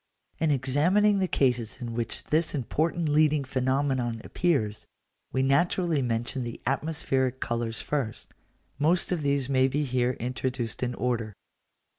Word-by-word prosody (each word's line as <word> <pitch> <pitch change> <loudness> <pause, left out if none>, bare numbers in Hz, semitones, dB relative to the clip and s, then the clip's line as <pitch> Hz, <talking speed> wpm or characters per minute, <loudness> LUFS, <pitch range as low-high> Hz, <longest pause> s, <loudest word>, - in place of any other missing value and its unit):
In 160 - +2
examining 160 +10 +3
the 190 - +1
cases 125 -8 0
in 120 -3 -5
which 115 0 -3
this 160 +1 0
important 160 +5 0
leading 150 -1 +3
phenomenon 130 -2 0
appears, 135 -13 0 0.4
we 130 - +1
naturally 160 +3 +2
mention 120 +1 -1
the 120 -1 -6
atmospheric 135 -2 0
colours 115 -1 -2
first: 135 -7 -3 0.5
most 170 +6 +2
of 175 -3 0
these 140 -2 +1
may 130 -1 +3
be 145 +3 0
here 125 -2 +1
introduced 125 -1 -3
in 125 -1 -1
order. 115 -4 -2
135 Hz, 135 wpm, -27 LUFS, 120-150 Hz, 0.5 s, examining